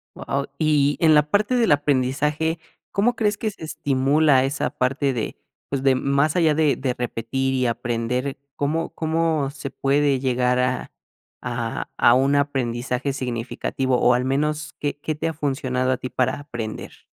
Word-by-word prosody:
Wao. 140 0 -3
Y 145 -2 +2
en 160 -2 +5
la 150 0 +3
parte 210 +6 +2
del 230 -8 +3
aprendizaje, 145 +3 +1 0.3
¿cómo 230 +5 +2
crees 210 -2 0
que 220 - -1
se 195 - -13
estimula 140 -1 +2
esa 140 +3 -1
parte 135 +2 0
de, 115 -3 -3 0.3
pues, 140 -2 -2
de 135 -1 +4
más 140 +4 +1
allá 160 -3 +4
de 150 -1 +2
de 130 -2 -2
repetir 125 +2 -2
y 130 -1 +1
aprender, 120 +3 -2 0.2
¿cómo 155 +3 -1
cómo 160 -3 0
se 140 -1 -7
puede 140 -1 +1
llegar 125 -1 +1
a, 125 0 -1 0.5
a - - -3
a 120 - +6
un 135 +3 +3
aprendizaje 130 -1 -1
significativo, 125 0 -2
o 125 - +4
al 125 +1 +1
menos 150 +3 -1
qué, 145 0 -2
qué 155 +1 -3
te 150 - -2
ha - - -4
funcionado 130 -3 -1
a 130 - +1
ti 130 0 -6
para 130 +2 0
aprender? 120 -7 -7
140 Hz, 165 wpm, -23 LUFS, 130-150 Hz, 0.5 s, a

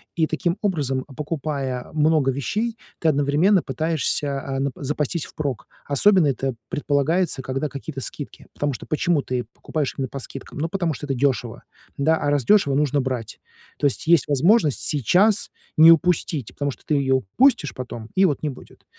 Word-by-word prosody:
И 165 - +2
таким 170 +3 -1
образом, 140 -10 -1
покупая 140 -3 -4
много 150 -3 +3
вещей, 215 - -2 0.2
ты 160 - +2
одновременно 150 +7 +3
пытаешься 150 -3 -1
а 135 -1 -3
на, 140 0 0
п - - -15
запастись 150 +2 -2
впрок. 140 -6 -4 0.2
Особенно 170 +3 +4
это 135 -2 -1
предполагается, 145 +2 0
когда 135 +3 -2
какие-то 140 0 -7
скидки. 145 - -8
Потому 145 -1 -1
что - - -8
почему 155 -1 +1
ты 125 -3 -3
покупаешь 150 -4 -3
именно 135 -1 -2
по 135 - -7
скидкам? 135 +2 -9
Ну 165 - -1
потому 175 -3 -1
что 145 - -7
это 135 - -1
дешево, 125 -3 -1 0.3
да, 160 +3 +3
а 145 - -1
раз 145 -5 +1
дешево, 165 -8 +4
нужно 145 -1 +2
брать. 125 -4 -4 0.4
То 145 - +3
есть 135 - -3
есть 170 -5 +4
возможность 150 - +3
сейчас 185 - +2 0.3
не 160 +1 +9
упустить, 165 - +2
потому 145 0 -2
что - - -14
ты 155 - -1
ее 135 -2 +2
упустишь 150 - +2
потом, 120 -3 -7
и 195 +1 +4
вот 155 -4 0
не 150 - 0
будет. 130 - -13
145 Hz, 175 wpm, -23 LUFS, 135-165 Hz, 0.4 s, не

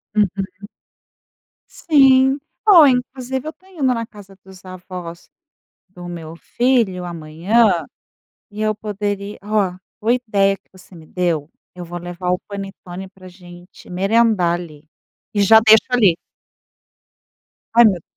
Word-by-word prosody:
Uhum. 195 -1 -2 1.0
Sim, 270 -3 +4 0.3
bom, 345 -9 +8
inclusive 255 +1 -2
eu 310 - -4
tô 370 +4 -27
indo 355 -7 -8
na 230 -1 -4
casa 200 -3 -15
dos 190 -1 -15
avós 180 -2 -9 0.6
do 180 -1 -11
meu 165 -2 -8
filho 235 -4 0
amanhã 175 +4 +1 0.7
e 210 +1 -9
eu 215 0 0
poderia 205 -1 -5
ó, 205 -3 0 0.2
boa 230 +2 +1
ideia 200 -5 +1
que - - -44
você 185 0 -18
me 160 -2 -14
deu. 170 -4 -2 0.2
Eu 180 -1 -8
vou 175 +1 -6
levar 175 +1 -6
o 180 - +1
panetone 195 -2 -8
pra 190 -1 -17
a - - -9
gente 175 0 -16
merendar 195 -1 +2
ali 155 -3 -12 0.5
e 205 - -1
já 220 +3 +7
deixo 220 0 +6
ali. 210 -9 +3 1.6
Ai, 235 +1 +7
meu 215 - +6
Deus. 175 - -8
195 Hz, 140 wpm, -19 LUFS, 180-225 Hz, 1.6 s, bom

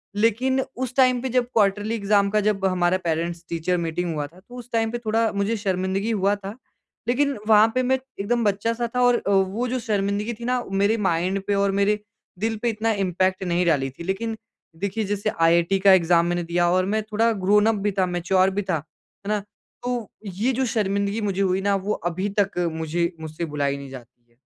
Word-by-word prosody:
लेकिन 230 +5 +2 0.2
उस 255 -1 -3
टाइम 255 -2 +4
पे 260 - -3
जब 250 0 +2
क्वार्टरली 205 +1 +2
एग्ज़ाम 200 -2 +2
का 215 - +2
जब 205 -2 0
हमारा 180 -1 +2
पेरेंट्स 170 +1 -2
टीचर 170 +2 -1
मीटिंग 170 0 -2
हुआ 150 -1 -2
था 170 +5 -19
तो 245 +6 -15
उस 245 0 -10
टाइम 225 -1 +1
पे 240 - -2
थोड़ा 225 +1 +1
मुझे 200 +2 0
शर्मिंदगी 195 +2 -1
हुआ 200 -1 +2
था। 200 +1 -8 0.5
लेकिन 275 +1 +1
वहाँ 215 0 +7
पे 255 - +2
मैं 260 +1 +2 0.2
एकदम 235 +4 0
बच्चा 205 +3 +1
सा 235 0 -2
था 250 - +2
और 245 -1 +5
अ, - - -4
वो 195 +5 +1
जो 255 +1 -2
शर्मिंदगी 210 0 -1
थी 235 - -6
ना 250 0 0
मेरे 200 +3 +2
माइंड 180 +4 0
पे 200 - +2
और 200 0 +2
मेरे 210 +1 +2 0.4
दिल 225 +2 0
पे 240 - +2
इतना 225 0 0
इम्पैक्ट 185 +1 0
नहीं 175 0 +1
डाली 140 -5 +2
थी। 135 +6 -10
लेकिन 220 +5 -3 0.5
देखिए 220 +3 -2
जैसे 205 +1 0
आईआईटी 170 +3 +2
का 195 0 +6
एग्जाम 170 -1 +4
मैंने 175 0 -1
दिया 175 +1 +1
और 185 +1 +2
मैं 220 - 0
थोड़ा 225 +2 +3
ग्रोनप 210 +3 +4
भी 205 - +1
था 185 - +4
मैच्योर 185 +2 +2
भी - - +1
था। 185 - -1
है 160 +6 -16
ना? 210 - +1 0.4
तो 245 -3 -3 0.2
ये 205 +6 -1
जो 260 +2 0
शर्मिंदगी 200 -1 -1
मुझे 200 -2 -1
हुई 190 0 +1
ना 200 0 +2
वो 195 +2 -1 0.2
अभी 190 +4 -2
तक 200 -2 0 0.2
मुझे 165 +2 -1
मुझसे 160 +2 -5
बुलाई 145 -2 -1
नहीं 140 -1 -9
जाती 120 -2 -13
है। 120 - -33
200 Hz, 210 wpm, -23 LUFS, 175-225 Hz, 0.5 s, वहाँ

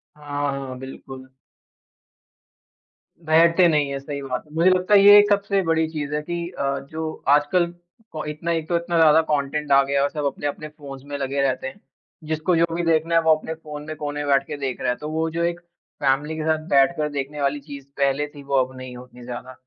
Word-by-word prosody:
हाँ, 145 -1 -3
हाँ, 135 -2 -6
बिल्कुल। 130 0 -10 2.0
बैठते 165 +3 +5
नहीं 150 -3 +2
है, 140 0 -3
सही 140 +1 -6
बात 130 -2 -4
है, 150 - -21
मुझे 170 +3 +4
लगता 185 +2 +2
है 200 - +8
ये 205 +1 +9
एक 205 0 +3
सबसे 200 -1 +2
बड़ी 160 -1 +1
चीज़ 150 -2 -4
है 150 - -1
कि 170 +2 -4
अ, 140 0 -1
जो 160 0 -5
आजकल 150 +5 +3 0.5
प 155 - -3
इतना 150 +3 -3
एक 165 -2 -2
तो 175 - +1
इतना 170 0 -2
ज़्यादा 160 -1 +6
कॉन्टेंट 150 0 -1
आ 140 0 +7
गया 140 +1 -1
है - - +3
और 140 - +1
सब 150 -1 -4
अपने-अपने 145 +2 -3
फ़ोन्स 140 -3 -11
में 145 0 -5
लगे 140 0 -2
रहते 130 -1 0
हैं। 130 - -10 0.5
जिसको 160 +3 0
जो 165 0 +4
भी 175 - -1
देखना 165 0 +2
है 165 - +5
वो 160 -1 +3
अपने 155 +1 -6
फ़ोन 150 -2 -9
में 155 - -5
कोने 145 -1 -5
में - - -5
बैठ 135 0 +4
के - - -5
देख 135 -3 -4
रहा - - 0
है, 125 - +1
तो 150 - -6
वो 160 +1 -1
जो 170 +1 -2
एक 170 0 -1 0.4
फैमिली 145 +3 +1
के 155 - -3
साथ 160 0 +1
बैठकर 150 +2 +3
देखने 145 +1 -4
वाली 140 +1 0
चीज़ 140 -1 -10
पहले 140 +1 +1
थी, 145 -1 -13
वो 140 0 -2
अब 130 +1 -10
नहीं 130 -1 -8
होती 125 0 -14
है - - -11
उतनी - - -11
ज़्यादा। 125 +1 -7
150 Hz, 230 wpm, -23 LUFS, 140-160 Hz, 2.0 s, ये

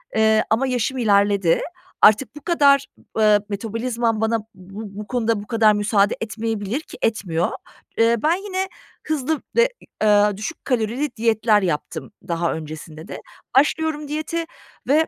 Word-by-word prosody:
eee, 220 0 +4
ama 245 +5 +2
yaşım 250 +1 -1
ilerledi. 200 -6 +3 0.4
Artık 215 +7 +5
bu 295 - -10
kadar, 280 -5 +4 0.3
ııı, 210 -1 +4
metabolizmam 225 +2 -2
bana 225 +1 +1
b 210 - -11 0.6
bu 210 - -7
konuda 230 -4 0
bu 205 - -12
kadar 220 -3 +4
müsaade 205 -1 +2
etmeyebilir 225 +2 -3
ki - - -12
etmiyor. 180 -6 0 0.5
Iıı, 230 +1 +5
ben 325 +3 +4
yine 380 -1 -2 0.4
hızlı 310 0 -1
ve, 475 +1 +5 0.3
ı - - +3
a 205 -1 +6
ııı, 205 -2 -1
düşük 220 +10 -6
kalorili 245 +3 -1
diyetler 220 -2 +3
yaptım 170 -1 -3 0.2
daha 170 0 0
öncesinde 155 0 -8
de. - - -7 0.4
Başlıyorum 300 +1 +2
diyete 310 +3 -3 0.4
ve 310 +4 +3
225 Hz, 145 wpm, -22 LUFS, 205-275 Hz, 0.6 s, a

